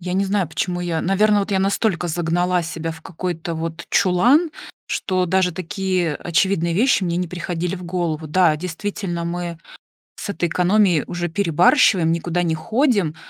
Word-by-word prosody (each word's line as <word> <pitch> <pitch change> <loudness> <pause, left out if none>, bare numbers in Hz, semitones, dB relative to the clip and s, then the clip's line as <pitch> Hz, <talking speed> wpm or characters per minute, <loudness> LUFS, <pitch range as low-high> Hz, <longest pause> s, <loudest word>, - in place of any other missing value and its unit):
Я 180 +1 -4
не 195 +1 +2
знаю, 195 -4 0
почему 175 +3 -2
я 170 -2 -2
наверно, 205 +3 +3
вот 200 0 -2
я 190 - +2
настолько 195 -3 0
загнала 175 +2 0
себя 165 -1 -4
в 160 0 -10
какой-то 170 -1 -4
вот 165 +1 -5
чулан, 245 - +3 0.4
что 185 -1 -1
даже 185 0 +2
такие 185 -3 -2
очевидные 170 0 0
вещи 225 -2 +3
мне 170 0 -1
не 180 -2 -2
приходили 175 +1 -3
в 180 - -9
голову. 170 -3 -2
Да, 160 -1 +3
действительно, 180 +1 -4
мы 170 -1 -4 0.6
с - - -7
этой 175 -4 -1
экономией 180 -2 +3
уже 175 0 -3
перебарщиваем, 175 - +3
никуда 175 +1 -1
не 160 -1 0
ходим, 205 - +1
175 Hz, 160 wpm, -21 LUFS, 165-190 Hz, 0.6 s, наверно